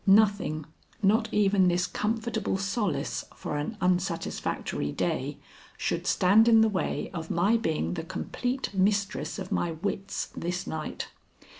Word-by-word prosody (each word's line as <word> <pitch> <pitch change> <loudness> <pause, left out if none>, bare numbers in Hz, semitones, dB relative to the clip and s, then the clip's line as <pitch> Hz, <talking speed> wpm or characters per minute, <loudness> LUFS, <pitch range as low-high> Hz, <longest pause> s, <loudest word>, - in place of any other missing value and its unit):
Nothing, 200 -7 +4 0.4
not 220 +3 +3
even 200 -2 +4
this 175 0 +2
comfortable 220 -2 -1
solace 195 - -1
for 150 - -4
an 150 +9 -3
unsatisfactory 180 - -1
day, - - -1 0.4
should - - -1
stand 205 +5 +5
in 225 -1 +7
the 220 - +5
way 195 -3 -2
of 160 -3 -5
my 195 +7 +3
being 155 - 0
the - - -3
complete 245 +9 -3
mistress 200 +2 +1
of 190 -2 -6
my 170 -1 0
wits 195 +3 -3
this 175 +1 -3
night. 155 -1 -4
195 Hz, 135 wpm, -28 LUFS, 170-210 Hz, 0.4 s, in